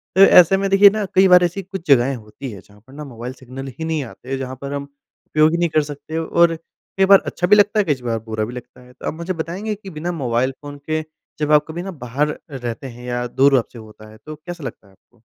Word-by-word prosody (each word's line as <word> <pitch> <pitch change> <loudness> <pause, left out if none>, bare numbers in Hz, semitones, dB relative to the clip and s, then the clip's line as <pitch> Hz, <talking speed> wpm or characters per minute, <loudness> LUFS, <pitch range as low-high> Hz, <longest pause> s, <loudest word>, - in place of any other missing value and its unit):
तो 190 - +5
ऐसे 180 0 +7
में 195 0 -1
देखिए 195 +1 +7
ना 215 0 -2
कई 190 +1 +6
बार 180 -1 +7
ऐसी 175 +3 -1
कुछ 190 -2 -8
जगहें 135 0 +4
होती 110 +3 -9
है 100 -3 -10
जहाँ 105 0 -21
पर 130 - -16
ना 150 +1 -8
मोबाइल 125 -1 -7
सिग्नल 130 +1 -9
ही - - -3
नहीं 160 -2 -1
आते, 130 +3 -7
जहाँ 130 -1 -5
पर 140 0 -5
हम 140 0 -3 0.4
उपयोग 155 +1 +3
ही 170 - 0
नहीं 170 0 +1
कर 155 -1 +2
सकते 145 +2 -7
और 165 +1 +2
कई 180 +3 -3
बार 195 0 +7
अच्छा 180 - -2
भी 210 - +7
लगता 210 +1 +3
है - - +4
कई 130 - -10
बार 115 -2 -1
बुरा 110 -1 -3
भी 120 - -8
लगता 125 0 -11
है। 125 0 -17
तो - - -8
आप - - -2
मुझे 170 +3 -4
बताएँगे 180 +6 -4
कि 200 -1 -11
बिना 170 +1 -4
मोबाइल 120 +2 +1
फ़ोन 145 0 -9
के 155 0 0 0.4
जब 150 0 0
आप 150 0 +5
कभी 165 +2 -5
ना 195 - -5
बाहर 145 +5 -1
रहते 125 -1 -5
हैं 120 0 -11
या 120 0 -2
दूर 135 +2 +4
आपसे 120 0 -9
होता 110 0 -14
है 110 - -15
तो 155 0 -7
कैसा 165 +2 -9
लगता 115 -5 -8
है - - -21
आपको? 115 +4 -32
145 Hz, 260 wpm, -20 LUFS, 125-175 Hz, 0.4 s, ऐसे